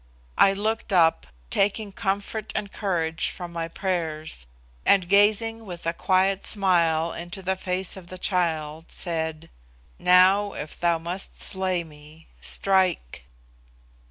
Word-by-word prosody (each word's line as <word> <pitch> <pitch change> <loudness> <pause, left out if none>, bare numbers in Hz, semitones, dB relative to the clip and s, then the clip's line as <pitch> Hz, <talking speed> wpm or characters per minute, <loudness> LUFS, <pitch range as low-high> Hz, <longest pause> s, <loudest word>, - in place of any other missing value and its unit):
I 195 - +6
looked 215 +2 -2
up, 165 - +3 0.2
taking 205 +1 +1
comfort 200 +2 -3
and 200 -1 -3
courage 165 -5 -1
from 175 -1 -8
my 165 -1 -3
prayers, 160 - -3 0.4
and, 190 -3 +4
gazing 215 +3 +3
with 175 -5 -9
a 165 - 0
quiet 190 +2 +1
smile 170 -5 +3
into 175 +3 -7
the 190 +1 0
face 185 0 -2
of 185 -3 -11
the 185 - -9
child, 165 -4 -1
said, 160 -2 -4 0.5
"Now, 190 +3 +5
if 150 - -7
thou 170 -1 +2
must 175 +4 -5
slay 185 -2 -1
me, 155 0 -16
strike." 185 - 0
180 Hz, 130 wpm, -25 LUFS, 165-195 Hz, 0.5 s, I